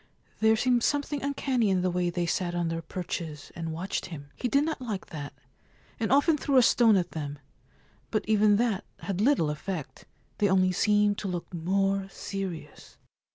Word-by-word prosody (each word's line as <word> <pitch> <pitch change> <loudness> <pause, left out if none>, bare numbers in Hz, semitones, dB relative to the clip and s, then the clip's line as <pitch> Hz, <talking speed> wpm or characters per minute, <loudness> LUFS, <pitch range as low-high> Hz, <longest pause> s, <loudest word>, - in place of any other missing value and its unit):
There 220 0 +5
seemed 245 +1 +2
something 285 +2 0
uncanny 270 -5 0
in 185 -2 +1
the 185 - +1
way 175 0 0
they 175 0 -1
sat 175 +1 -1
on 170 -1 0
their 165 0 -3
perches 165 -4 -5
and 165 -1 -4
watched 180 +5 -3
him. 145 -5 -9
He 250 - -2
did 280 +4 +3
not 320 -4 -3
like 215 -6 -4
that, 145 -3 -6 0.7
and 225 - -1
often 285 +3 +4
threw 275 -2 +2
a 255 - +7
stone 230 -2 +5
at 180 - -1
them; 145 -2 -5 0.7
but 215 - -1
even 210 -1 +4
that 220 -3 +1 0.2
had 195 -1 -2
little 220 - +3
effect 155 0 -6 0.2
— - - -38
they 205 - +3
only 185 -1 +4
seemed 205 +2 +2
to 200 - -4
look 180 -1 -5
more 195 +3 0
serious. 185 -7 -7
195 Hz, 185 wpm, -28 LUFS, 170-225 Hz, 0.7 s, a